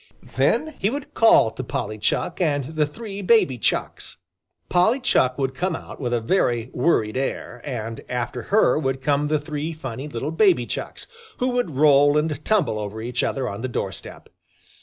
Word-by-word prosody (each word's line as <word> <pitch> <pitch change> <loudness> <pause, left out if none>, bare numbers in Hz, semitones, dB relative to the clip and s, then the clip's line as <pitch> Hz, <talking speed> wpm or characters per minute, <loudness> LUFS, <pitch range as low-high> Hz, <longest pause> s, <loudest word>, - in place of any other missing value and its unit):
Then 315 0 +1
he 200 - +1
would 280 +3 -6
call 225 - +5
to 130 - -6
Polly 110 -3 -4
Chuck 165 - -1
and 145 -2 0
the 150 -1 +2
three 205 +4 -7
baby 185 - +3
Chucks. - - -2 0.5
Polly 200 +9 +3
Chuck 130 - +2
would 135 -1 -1
come 180 +4 -1
out - - -9
with 120 -2 -2
a 120 - +1
very 120 -3 0
worried 120 -6 +1
air, 130 -2 -3
and 115 -5 -5
after 125 0 -3
her 205 -6 +4
would 135 -3 -1
come 145 +2 +1
the 155 +1 +2
three 150 +1 -4
funny 135 -3 -6
little 145 +2 -4
baby 165 - +3
Chucks, - - -5 0.3
who 255 - 0
would 245 - -1
roll 145 0 +5
and 150 -1 -1
tumble 180 - +1
over 105 +1 -5
each 120 +2 -2
other 135 -2 -1
on 100 0 -5
the 130 - -2
doorstep. 95 -7 -6
145 Hz, 180 wpm, -23 LUFS, 120-170 Hz, 0.5 s, call